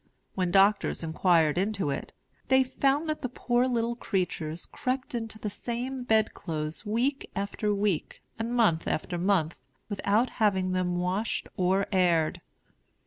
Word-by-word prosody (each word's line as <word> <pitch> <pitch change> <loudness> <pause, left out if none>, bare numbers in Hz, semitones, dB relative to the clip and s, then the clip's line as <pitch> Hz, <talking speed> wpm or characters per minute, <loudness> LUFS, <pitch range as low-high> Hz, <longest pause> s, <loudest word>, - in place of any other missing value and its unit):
When 185 -2 0
doctors 195 0 +3
inquired 165 -1 +3
into 195 -6 0
it, 140 - -4 0.4
they 265 +1 +5
found 275 +4 +1
that 310 0 -2
the 255 - -2
poor 245 0 +1
little 235 -1 0
creatures 175 -7 -2
crept 260 -3 -3
into 225 -2 -4
the 210 -1 -4
same 245 +4 -4
bedclothes 165 -9 -1
week 250 +6 0
after 200 +2 -1
week, 200 -5 -1 0.2
and 225 +1 -2
month 220 -10 +2
after 175 +2 -2
month, 175 -4 +1 0.3
without 210 +4 +1
having 190 -3 +2
them 180 -1 0
washed 185 +5 -1
or 190 +2 +2
aired. 175 -5 +2
200 Hz, 140 wpm, -28 LUFS, 180-235 Hz, 0.4 s, they